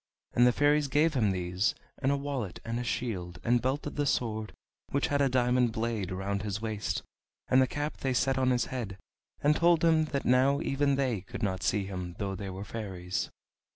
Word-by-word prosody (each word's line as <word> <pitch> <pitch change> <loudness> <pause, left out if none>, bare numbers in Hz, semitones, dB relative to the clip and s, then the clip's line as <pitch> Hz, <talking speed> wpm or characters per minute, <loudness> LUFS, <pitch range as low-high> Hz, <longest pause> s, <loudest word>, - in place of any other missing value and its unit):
And 120 +1 +5
the - - +6
fairies 145 +2 +3
gave 150 +4 +3
him 115 -7 +2
these, 90 +2 0 0.3
and 135 0 +2
a 140 - +2
wallet, 135 - -4
and 115 +1 -2
a - - -2
shield, 95 -8 -3
and 120 +1 +3
belted 140 +3 -2
the 145 -1 +1
sword, 110 -5 -1 0.4
which 140 - 0
had 145 0 +2
a 140 - +4
diamond 125 -2 +2
blade, 110 -4 -2
round 100 +2 -2
his 105 -1 -3
waist, 110 -2 -2 0.5
and 130 - +6
the 130 - +3
cap 145 +3 -3
they 130 -2 -1
set 130 +1 +2
on 130 -1 +3
his 125 -1 +2
head, 110 -7 -4 0.5
and 150 +1 +5
told 170 -1 +4
him 160 -1 +4
that 140 -3 -3
now 130 +3 +4
even 140 0 +1
they 130 -7 0
could 100 +3 -7
not 95 -3 -1
see 100 0 +1
him 90 -2 -5
though 100 -2 -2
they 95 0 -5
were 95 +2 -6
fairies. 95 -4 -4
120 Hz, 205 wpm, -30 LUFS, 100-140 Hz, 0.5 s, the